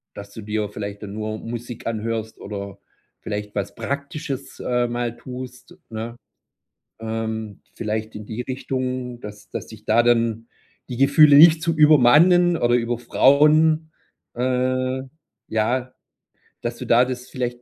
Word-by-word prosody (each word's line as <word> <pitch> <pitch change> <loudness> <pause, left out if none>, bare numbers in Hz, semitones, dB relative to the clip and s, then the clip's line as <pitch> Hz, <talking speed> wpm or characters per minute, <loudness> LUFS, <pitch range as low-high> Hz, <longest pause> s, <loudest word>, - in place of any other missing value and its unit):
dass 100 0 -10
du 110 - -8
dir 105 0 -2
vielleicht 100 0 -7
dann 100 -1 -7
nur 110 0 -4
Musik 120 +1 -7
anhörst 110 0 -3
oder 100 -1 -7 0.4
vielleicht 105 0 -5
was 100 -1 -4
Praktisches, 140 +2 -5
äh, 125 -1 0
mal 120 0 -3
tust, 125 +7 -10
ne? 115 +1 -6 0.8
Ähm. 110 -2 -4
Vielleicht 110 0 -4
in 105 0 -8
die 110 +3 -5
Richtung, 130 -1 -4
dass 105 0 -10
dass - - -6
dich 110 -1 -13
da 115 +2 +4
dann 115 -1 +1 0.4
die 125 - -4
Gefühle 140 +2 +6
nicht 160 +2 +8
zu 165 0 0
übermannen 155 +4 +6
oder 120 -6 +2
überfrauen, 150 +7 +3 0.4
äh, 130 +1 0 0.5
ja, 125 +4 -1 0.7
dass - - -3
du - - -7
da 120 +2 +5
das 125 0 -6
vielleicht 120 -1 -4
120 Hz, 135 wpm, -22 LUFS, 110-130 Hz, 0.8 s, nicht